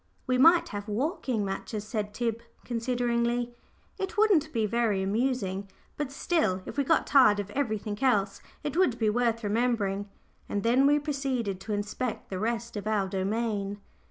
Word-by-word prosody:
"We 255 -1 +1
might 335 +5 +6
have 205 0 -5
walking 240 - -1
matches," 200 +2 -4
said 215 -1 -3
Tib, 230 +1 -2 0.2
consideringly. 240 0 0 0.5
"It 385 +3 -4
wouldn't 380 -8 +4
be 225 -5 +1
very 215 -3 +1
amusing; 200 -2 -1 0.3
but 295 -3 -3
still, 275 - 0
if - - -7
we 280 - +2
got 325 - +2
tired 255 -8 +5
of 205 0 -4
everything 215 -6 -2
else, 200 -6 +2 0.2
it 295 -1 -3
would 340 -10 +3
be 220 -3 +2
worth 230 0 +1
remembering;" 205 -2 0 0.4
and 205 - -1
then 250 +4 +4
we 290 +1 +5
proceeded 270 -9 -2
to 210 +2 -4
inspect 205 +4 -3
the 185 - -3
rest 230 +2 -2
of 205 0 -4
our 210 -3 +1
domain. 200 +1 -1
230 Hz, 160 wpm, -28 LUFS, 205-255 Hz, 0.5 s, might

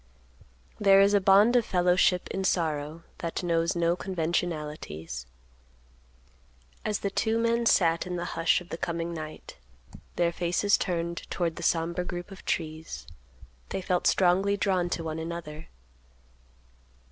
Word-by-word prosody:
There 195 -1 +6
is 200 +1 +5
a 205 - +4
bond 200 +5 +5
of 245 - +5
fellowship 180 -1 +2
in 195 - -3
sorrow 160 -3 -1 0.2
that 170 +2 -3
knows 170 +1 +1
no 170 0 +2
conventionalities. 155 - -3 1.6
As 210 -2 -1
the 200 - -1
two 220 +3 +1
men 230 0 +1
sat 170 -3 +3
in 180 - -3
the 175 0 -3
hush 165 +2 +2
of 175 - -13
the 165 - -5
coming 170 0 -3
night, 155 -1 -8 0.6
their 170 -1 +2
faces 180 +4 +2
turned 170 -1 -3
toward 170 -3 -1
the - - -7
somber 170 +1 0
group 175 +1 -6
of 195 - -11
trees, 160 -1 -3 0.6
they - - -2
felt 180 -1 0
strongly 195 +2 +3
drawn 185 -3 +1
to 170 - -2
one 160 0 -4
another. 160 -1 -6
175 Hz, 140 wpm, -28 LUFS, 165-190 Hz, 1.6 s, There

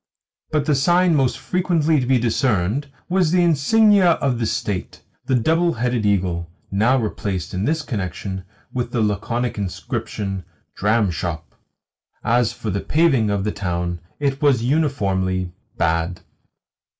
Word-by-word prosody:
But 150 -2 0
the 150 - +2
sign 175 +6 +3
most 135 -4 +2
frequently 165 -4 +1
to 125 - -2
be 130 0 +4
discerned 115 +1 0 0.2
was 180 -2 +2
the 180 +1 +3
insignia 185 +4 +4
of 135 -6 -1
the 115 - 0
State, 105 -4 -3 0.2
the 130 - +2
double 165 +8 +2
headed 120 -2 0
eagle 90 -4 0 0.2
(now 110 +7 +3
replaced, 100 - -3
in 95 +2 -1
this 160 +1 0
connection, 95 -5 -4 0.3
with 125 -1 -3
the 115 - +1
laconic 110 +3 -1
inscription 95 0 -4 0.3
"Dramshop"). 95 -6 0 0.8
As 120 0 +2
for 110 - -5
the 100 +1 -2
paving 140 -9 +2
of 100 -1 0
the 105 - -1
town, 90 -3 -3 0.2
it 140 -1 -1
was 135 -6 +3
uniformly 95 - 0 0.3
bad. 85 +2 0
115 Hz, 140 wpm, -21 LUFS, 95-145 Hz, 0.8 s, be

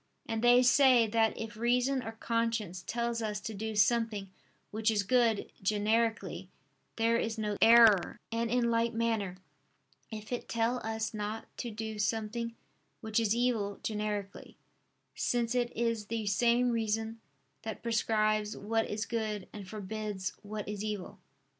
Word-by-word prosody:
And 225 -1 -2
they 245 +1 +6
say 255 -2 +6
that 225 0 +1
if 225 -2 -6
reason 250 +4 +1
or 225 -1 -6
conscience 225 -5 -1
tell 235 0 -1
us 220 -3 -2
to 220 - -5
do 220 +2 -4
something 210 -3 +1 0.4
which 220 +1 +1
is 210 -2 +1
good 230 0 +2
generically, 215 +3 0 0.5
there 230 0 +2
is 225 -1 -2
no 210 -1 -1
error: 225 -5 +6
and 230 0 -1
in 240 0 +2
like 230 0 +1
manner 225 -5 -1 0.7
if 215 -1 -8
it 245 - -4
tell 230 +2 0
us 220 0 -2
not 215 +1 -5
to 240 - -4
do 220 -1 -5
something 225 +2 -2 0.5
which 220 0 0
is 225 -1 +2
evil 230 -5 0
generically; 210 -2 -4 0.6
since 240 -1 0
it 245 -1 0
is 230 -2 0
the 225 -1 -3
same 240 +4 +3
reason 225 0 -1 0.4
that 220 - -6
prescribes 215 -2 +1
what 225 +2 -1
is 210 +1 -2
good 215 -4 -3
and 205 -3 -8
forbids 210 -2 -4
what 210 0 -6
is 210 0 -4
evil. 210 -2 -5
225 Hz, 145 wpm, -31 LUFS, 210-230 Hz, 0.7 s, they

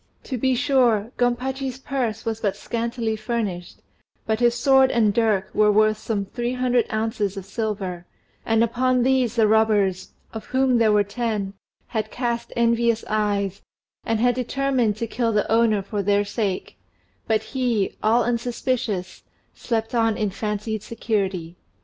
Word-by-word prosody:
To 265 - -4
be 260 +2 +1
sure, 245 -5 +2
Gompachi's 255 +2 -1
purse 260 -5 -3
was 225 -1 -3
but 200 -3 -1
scantily 230 -1 -2
furnished, 215 -6 -4 0.4
but 220 0 0
his 240 -1 +3
sword 265 0 +5
and 220 -4 +2
dirk 210 -4 +1
were 210 0 +4
worth 215 +1 +3
some 205 -3 -2
three 240 +4 -3
hundred 250 -2 +1
ounces 215 -2 -1
of 195 - -6
silver, 195 -5 -4 0.4
and 225 0 +2
upon 250 +2 +1
these 255 -3 +2
the 225 -2 +4
robbers 210 -4 +2 0.2
(of 220 - -7
whom 260 -2 +2
there 220 -2 +4
were 210 -1 +4
ten) 205 -2 -3 0.4
had 220 -2 -2
cast 235 0 -3
envious 235 -1 +2
eyes, 205 -2 0 0.4
and 225 -1 0
had 245 +2 +3
determined 250 -2 0
to 230 - -2
kill 230 +1 -1
the 210 -1 +1
owner 225 -3 +3
for 205 +1 -3
their 205 +1 +2
sake; 200 -3 -3 0.5
but 220 -1 +1
he, 240 -7 0
all 230 +3 +3
unsuspicious, 235 -5 -2 0.3
slept 225 -1 -3
on 225 -2 +2
in 210 -4 -1
fancied 210 +1 -3
security. 190 -7 -3
225 Hz, 150 wpm, -23 LUFS, 210-240 Hz, 0.5 s, sword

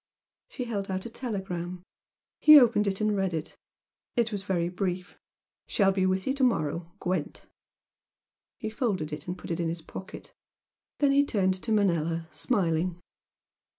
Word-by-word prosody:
She 255 - -5
held 205 -5 -3
out 190 0 -2
a 235 - -6
telegram. 185 -7 -4 0.6
He 305 -1 +10
opened 230 -5 +3
and 215 -1 +1
read 190 -3 0
it. 155 0 -5 0.6
It 235 -1 +1
was 205 -2 -3
very 185 -4 0
brief 180 0 -3 0.5
"Shall 195 -2 +3
be 190 -1 +1
with 185 0 0
you 265 - +1
to 275 -1 -1
morrow. 170 - 0
Gwent." 180 -4 -3 1.1
He 220 -2 -4
folded 200 - -1
it 150 +2 -7
and 180 +1 -3
put - - -8
it 165 - -2
in 170 -1 0
his 165 0 -5
pocket. 185 - -9 0.6
Then 285 -1 +3
he 280 +1 +5
turned 190 -8 +1
to 225 - -3
Manella, 170 -5 +1
smiling. 175 -6 0
190 Hz, 155 wpm, -28 LUFS, 175-220 Hz, 1.1 s, He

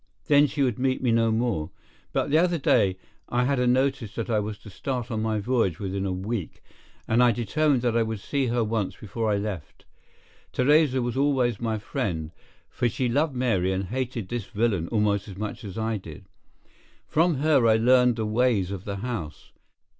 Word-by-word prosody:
Then 145 0 +5
she 145 -1 -1
would 125 -4 0
meet 130 0 0
me 120 - +3
no 115 0 +3
more. 110 -9 -1 0.4
But - - -1
the 155 - +5
other 175 0 +2
day 95 -9 +2 0.3
I 125 +1 +1
had 135 +1 +1
a 125 - +2
notice 130 -3 +1
that 115 +1 -3
I 110 - +3
was 105 0 -4
to 105 - -11
start 120 +5 -4
on 110 -1 -1
my 110 -1 0
voyage 110 -6 0
within 100 0 -3
a - - -1
week, 95 0 -4 0.4
and 115 +2 +3
I 125 -1 +6
determined 130 +4 +1
that 120 -2 +1
I 115 - +3
would 110 -1 -2
see 135 +5 -1
her 120 0 +1
once 110 -3 -2
before 110 +2 -3
I 100 - +2
left. 100 -7 -6 0.7
Theresa 135 -1 +3
was 120 +1 -3
always 130 -6 +1
my 110 -2 -1
friend, 85 -6 -3 0.4
for 120 - -1
she 125 +2 -1
loved 145 +3 +1
Mary 115 -8 +1
and 95 +1 -1
hated 120 -4 -3
this 120 -4 -3
villain 105 -6 0
almost 105 -1 0
as 95 -3 -9
much 105 +4 -5
as 100 -2 -7
I 110 0 -1
did. 80 -6 -11 0.8
From 165 +1 +2
her 140 -3 +3
I 110 - +5
learned 125 +1 +4
the 110 -1 -2
ways 105 -4 +1
of 100 -1 -6
the 100 - -3
house. 105 - -6
115 Hz, 200 wpm, -26 LUFS, 105-130 Hz, 0.8 s, I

